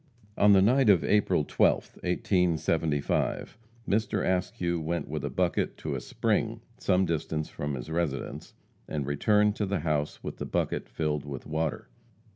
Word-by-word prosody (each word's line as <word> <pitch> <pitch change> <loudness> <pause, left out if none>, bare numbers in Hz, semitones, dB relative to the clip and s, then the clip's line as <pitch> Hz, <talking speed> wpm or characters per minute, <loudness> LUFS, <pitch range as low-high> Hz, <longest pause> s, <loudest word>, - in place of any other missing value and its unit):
On 105 0 +6
the 95 -1 +6
night 125 +2 +4
of 95 -5 +5
April 95 -7 +2
12th, - - +1
1875, 80 -5 0 0.3
Mr. 105 -1 +1
Askew 90 -2 0
went 85 +2 -2
with 75 -1 -4
a 70 - -1
bucket 85 +6 0
to - - -4
a - - -3
spring - - -1 0.2
some 95 +1 +2
distance 80 -2 -2
from 75 -1 -4
his 65 +5 -7
residence, 80 -5 -3 0.3
and 75 -3 -3
returned 105 +9 +2
to 105 - -1
the 100 +1 -1
house 75 -2 -1
with - - -5
the - - -5
bucket - - -1
filled 75 -2 -1
with 70 -3 -7
water. 80 0 -2
85 Hz, 155 wpm, -28 LUFS, 75-95 Hz, 0.3 s, On